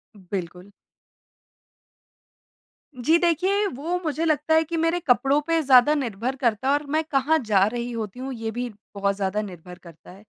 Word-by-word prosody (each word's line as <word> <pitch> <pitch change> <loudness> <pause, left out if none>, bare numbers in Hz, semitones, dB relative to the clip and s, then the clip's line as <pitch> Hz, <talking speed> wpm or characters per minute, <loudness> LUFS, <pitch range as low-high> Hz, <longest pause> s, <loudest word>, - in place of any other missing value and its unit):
बिल्कुल। 180 -1 -7 2.3
जी 320 +4 +5
देखिए, 370 +4 +1
वो 335 +3 -3
मुझे 315 0 -1
लगता 310 0 +1
है 320 - +4
कि 330 +1 -4
मेरे 330 +2 +1
कपड़ों 275 -1 +2
पे 330 -1 +2
ज़्यादा 265 0 +6
निर्भर 245 -2 -3
करता 250 -2 -1
है 275 - +4
और 290 +1 0
मैं 315 +1 +1
कहाँ 300 +1 +1
जा 200 -3 +4
रही 240 +2 -4
होती 225 -1 -5
हूँ 265 +1 -5
ये 225 -2 -4
भी 245 +2 -4 0.3
बहुत 200 0 0
ज़्यादा 195 +1 -1
निर्भर 180 -3 -10
करता 170 -2 -15
है। 195 +3 -15
255 Hz, 170 wpm, -24 LUFS, 205-315 Hz, 2.3 s, ज़्यादा